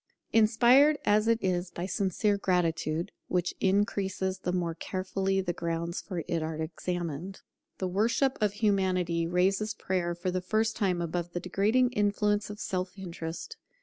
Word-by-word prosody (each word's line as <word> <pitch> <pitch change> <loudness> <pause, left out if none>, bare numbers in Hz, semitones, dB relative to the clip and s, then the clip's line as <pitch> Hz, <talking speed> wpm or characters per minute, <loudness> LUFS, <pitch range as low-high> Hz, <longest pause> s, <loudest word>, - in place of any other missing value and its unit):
Inspired 240 +7 +6
as 210 +1 +3
it 230 0 +4
is 180 -1 0
by 175 0 -5
sincere 200 +2 +1
gratitude, 170 -4 0 0.2
which 180 -1 0
increases 190 -1 0
the 180 - -2
more 175 -2 -1
carefully 190 +2 -1
the 175 -2 -2
grounds 170 0 -3
for 180 -5 -4
it 165 -1 0
are 160 0 -3
examined, 170 +2 -4 0.4
the 185 - -2
worship 230 +8 +1
of 210 -2 +2
Humanity 185 -5 +1
raises 195 +4 +1
Prayer 175 -3 -1
for 180 +2 -2
the 185 0 -1
first 220 +4 0
time 180 -4 0
above 170 +1 -3
the 175 - -1
degrading 215 +8 +2
influence 210 -1 +1
of 210 0 -7
self 185 -1 -3
interest. 170 - -6
185 Hz, 150 wpm, -29 LUFS, 175-205 Hz, 0.4 s, Inspired